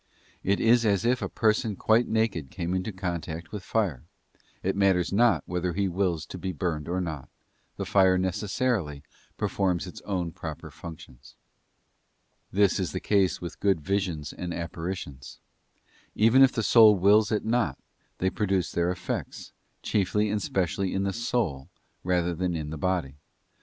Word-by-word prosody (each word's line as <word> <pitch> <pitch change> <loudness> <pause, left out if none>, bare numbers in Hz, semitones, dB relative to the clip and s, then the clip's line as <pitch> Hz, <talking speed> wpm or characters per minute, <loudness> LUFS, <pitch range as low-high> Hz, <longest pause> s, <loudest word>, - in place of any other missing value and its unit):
It 100 +1 +1
is 115 +1 +4
as 105 -1 +2
if 125 +1 +2
a - - -2
person 110 -1 +1
quite 110 +5 +3
naked 110 -11 0
came 85 +3 -3
into 95 +3 -2
contact 85 -3 -5
with 105 - -5
fire: 95 - -1 0.6
it 95 - 0
matters 95 -2 +2
not 120 +3 +4
whether 90 0 -2
he 100 +2 0
wills 90 -3 -1
to - - -8
be 95 - -3
burned 80 -1 -3
or 90 +1 0
not, 80 -7 -5 0.5
the - - -3
fire 95 -2 +4
necessarily 95 - -1 0.3
performs 90 -3 0
its 90 - -9
own 90 -4 -2
proper - - -7
functions. 75 -6 -12 1.2
This 100 0 +3
is 95 - -2
the 90 - -2
case 100 -2 +1
with 85 - -7
good 100 -4 +2
visions 90 -4 -2
and 90 -1 -5
apparitions: 85 -5 -6 0.8
even 115 +5 +5
if 135 -1 +7
the 115 - -2
soul 110 -1 +7
wills 100 +3 +4
it 105 - 0
not, 115 - +1 0.4
they 95 0 0
produce 95 -4 0
their 85 0 0
effects, 90 0 -5 0.3
chiefly 105 +1 +1
and 105 0 -1
specially 95 +1 -1
in 95 - 0
the 100 -1 -1
soul 115 - -2 0.3
rather 90 -1 +1
than 90 0 -1
in 75 -2 -4
the - - -4
body. 85 -7 -1
95 Hz, 160 wpm, -27 LUFS, 85-105 Hz, 1.2 s, if